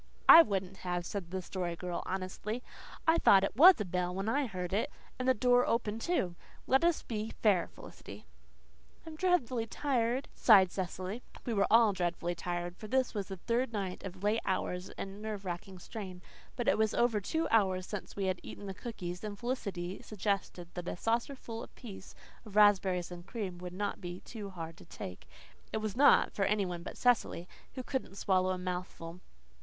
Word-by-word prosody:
"I 330 - +12
wouldn't 195 - -2
have," 175 -1 -3
said 190 -3 -5
the 185 0 -4
Story 175 -2 -3
Girl 180 0 -4
honestly. 190 +5 -4 0.4
"I 325 +1 +5
thought 195 -1 +6
it 195 - -1
WAS 350 +6 +9
a 210 - -1
bell 180 0 -1
when 195 +2 -2
I 275 +4 +1
heard 185 -3 -4
it, 210 - +1 0.3
and 255 - -1
the 260 - +5
door 245 +2 +4
open, 225 -2 0
too. 230 - 0 0.3
Let 265 +4 +3
us 340 -1 +2
be 220 -1 -3
fair, 200 -6 +4
Felicity." - - -12 0.8
"I'm 320 -1 -8
dreadful 300 -10 +1
tired," 250 0 0
sighed 195 -6 +6
Cecily. 190 +4 -4 0.2
We 235 - -1
were 200 -2 +3
all 225 -2 +6
"dreadful 175 -1 -1
tired," 175 +1 -4
for 215 - -8
this 260 +2 +1
was 205 -3 -3
the 190 -2 -6
third 235 +6 -1
night 195 -3 -3
of 190 0 -8
late 210 +2 +2
hours 185 -1 -2
and 195 +1 -6
nerve 215 -2 -5
racking 185 +1 -5
strain. 185 -1 -8 0.3
But 240 - -3
it - - +3
was 220 -1 +2
over 230 -3 +2
two 320 +11 -1
hours 190 -4 +3
since 205 -1 -6
we 200 - -1
had 185 -1 0
eaten 205 - -9
the 195 - -4
cookies, 185 -4 -6
and 210 -1 -5
Felicity 200 -7 -3
suggested 195 -4 -2
that 175 -1 -6
a - - -3
saucerful 230 +1 -2
apiece 200 -6 -10 0.3
of 210 -3 -12
raspberries 190 -4 +4
and 175 0 -8
cream 190 -3 -5
would 180 0 -6
not 205 +2 -3
be 175 0 -6 0.3
hard 165 -2 -7
to - - -14
take. 90 - -8 0.4
It - - -1
was 215 -1 -3
not, 285 +3 +6
for 195 - +1
any 205 -1 +1
one 175 -2 -4
but - - -8
Cecily, 235 -8 +2 0.3
who 255 - -4
couldn't 260 -7 -3
swallow 185 -2 +2
a 185 - 0
mouthful. 180 -1 -5
200 Hz, 190 wpm, -32 LUFS, 180-230 Hz, 0.8 s, I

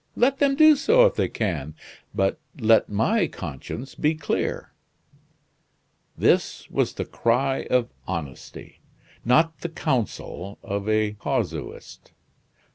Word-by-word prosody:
Let 265 +3 +2
them 280 -1 +3
do 310 +1 +7
so 475 - +5
if - - +3
they - - 0
can; 80 -9 -3 0.4
but 95 +9 0 0.2
let 110 -1 +4
my 170 - +2
conscience 90 - -7
be 155 +1 +1
clear." 155 -2 -2 1.5
This - - +1
was - - 0
the - - -4
cry 130 +3 0
of 125 -1 +1 0.2
honesty; 80 -8 -7 0.4
not 160 +7 +3
the 170 - -4
counsel 110 - -3
of 100 +1 -3
a 110 -1 +2
casuist. - - -4
120 Hz, 120 wpm, -24 LUFS, 100-165 Hz, 1.5 s, do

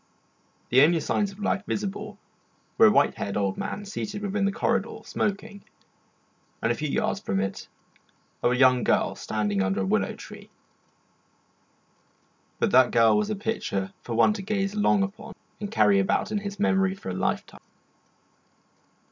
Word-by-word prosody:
The 130 +2 +5
only 165 +3 +5
signs 200 +5 -1
of 195 - -15
life 205 -2 -1
visible 205 +1 -4 0.6
were 225 - +9
a - - +5
white - - +3
haired 100 - -4
old 100 -2 0
man 205 - -5
seated 205 0 -5
within 200 0 -1
the 200 - +1
corridor 230 +2 -1
smoking, 205 0 -3 1.0
and - - 0
a - - 0
few - - -3
yards - - -1
from 95 - -2
it 95 0 -4 0.7
a 120 - +2
young 125 -1 +4
girl - - +1
standing 105 -2 -2
under 95 +1 0
a - - -1
willow - - 0
tree. - - -12 2.1
But - - 0
that 130 -1 +6
girl 115 -1 +4
was 210 0 0
a 215 - -1
picture 100 - -3
for 115 - -5
one 115 - +4
to 210 - -6
gaze 195 0 -2
long 205 -1 +2
upon 195 +2 -7 0.3
and 205 -1 -5
carry 105 - +4
about 95 - 0
in 210 - 0
his 200 0 -7
memory 195 -3 +2
for 195 - -8
a - - -3
lifetime. - - -3
195 Hz, 165 wpm, -26 LUFS, -, 2.1 s, were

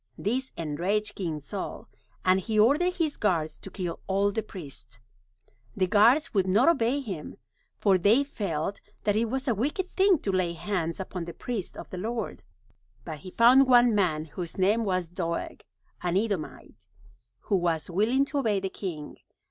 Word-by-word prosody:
This 260 +6 -2
enraged 185 +7 -1
King 165 -7 -3
Saul, 145 - -6 0.4
and 185 +1 +5
he 215 +3 -2
ordered 300 +11 +4
his 325 -5 0
guards 165 -7 0
to - - -9
kill 180 -3 -4
all 200 +1 +2
the 220 - -1
priests. 140 - -9 0.8
The 185 - +3
guards 230 - +4
would 190 -3 +2
not 210 - +4
obey 280 -4 +3
him, 190 - -6 0.4
for 195 -3 +3
they 220 +9 +4
felt 200 - -3 0.2
that 205 - +2
it 225 +2 +2
was 265 +4 -3
a 240 - +3
wicked 295 - -1
thing 385 -1 +3
to 200 - 0
lay 185 -2 0
hands 170 -1 -2
upon 185 -2 -5
the 170 - -8
priests 225 -7 -4
of - - -9
the 185 - -5
Lord. 225 - -4 0.6
But 155 -2 -6
he 185 - -9
found 250 +7 +6
one 245 -2 +6
man 165 -7 +1
whose 170 +2 -6
name 210 +4 +2
was 185 -3 0
Doeg, 170 -1 -4 0.4
an 180 0 0
Edomite, 200 -7 -4 0.5
who 200 - +1
was 170 -3 0
willing 230 +9 +2
to 285 0 -2
obey 215 -7 +1
the 190 0 -3
king. 170 -7 -6
200 Hz, 170 wpm, -27 LUFS, 175-235 Hz, 0.8 s, found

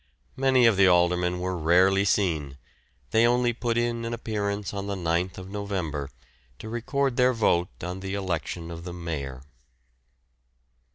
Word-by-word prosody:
Many 130 -2 +4
of 115 -4 +4
the 100 -1 +6
aldermen 90 0 +3
were 90 +1 -2
rarely 90 +4 +4
seen; 80 -9 0 0.5
they 115 +1 +5
only 120 0 +2
put 120 0 -1
in 120 0 0
an 115 0 -2
appearance 105 -3 -3
on 100 0 -4
the 100 - -2
9th 90 +1 -2
November 95 -8 -3 0.5
to 110 - -8
record 130 +3 -1
their 125 0 +4
vote 90 -8 0
on 90 +2 -4
the 95 +1 -4
election 85 -3 -3
of 85 0 -8
the 90 0 -6
Mayor. 70 -7 -5
95 Hz, 150 wpm, -26 LUFS, 85-115 Hz, 0.5 s, the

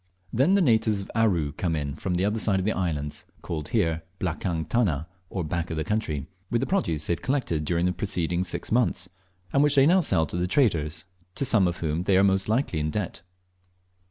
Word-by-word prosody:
Then 140 - +4
the 200 - +4
natives 110 -6 +3
of 95 - -9
Aru 95 -10 +2
come 80 +3 -2
in 70 -2 -3
from 90 +4 -3
the 90 +2 +1
other 105 +2 0
side 100 -3 +2
of 95 - -1
the 110 - +2
islands 75 -7 -2 0.2
(called 75 -3 -4
here 80 0 +1 0.2
"blakang 85 -2 -2
tana," 85 - +1 0.2
or 95 - -3
"back 85 +2 -3
of 80 - -3
the 80 - 0
country") 80 -7 -2 0.2
with 120 - +1
the 130 - 0
produce 85 - 0
they - - +2
have - - -5
collected 125 - -1
during 85 +2 +1
the 90 - +2
preceding 90 -2 -1
six 90 - -3
months, 110 -6 +1 0.4
and 140 - +4
which 145 0 +4
they 135 -1 +6
now 180 +5 +5
sell 85 - +2
to 80 - -5
the 90 +1 0
traders, 85 - +1 0.3
to 140 - 0
some 105 -7 +4
of 85 0 -4
whom 80 0 -1
they 95 +1 +3
are 95 - +5
most 95 0 +2
likely 110 - 0
in 75 +1 -1
debt. 90 -1 -3
90 Hz, 220 wpm, -26 LUFS, 80-110 Hz, 0.4 s, they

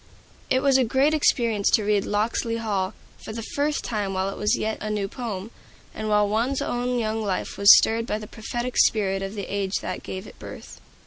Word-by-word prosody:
It 260 0 +2
was 270 -2 +4
a - - +4
great 265 +5 +2
experience 235 -8 +2
to 215 - +3
read 205 -1 +1
"Locksley 225 +2 -1
Hall" 205 -3 -2 0.3
for 220 - -7
the 230 0 -5
first 290 +5 -1
time 205 -4 -2
while 190 +1 -1
it - - -7
was 210 - +1
yet 220 0 -2
a 215 - -3
new 210 -2 -1
poem, 215 -2 -6 0.4
and 215 0 -4
while 210 0 +3
one's 235 +6 0
own 245 +1 -1
young 220 -1 -1
life 195 -3 -2
was 200 0 +9
stirred 230 +1 +1
by 210 - -1
the 215 - -7
prophetic 240 +3 -5
spirit 195 -3 +3
of 195 +2 -5
the 200 -2 -4
age 200 -1 -2
that - - -5
gave 190 +2 -6
it - - -14
birth. - - -10
215 Hz, 210 wpm, -24 LUFS, 200-240 Hz, 0.4 s, was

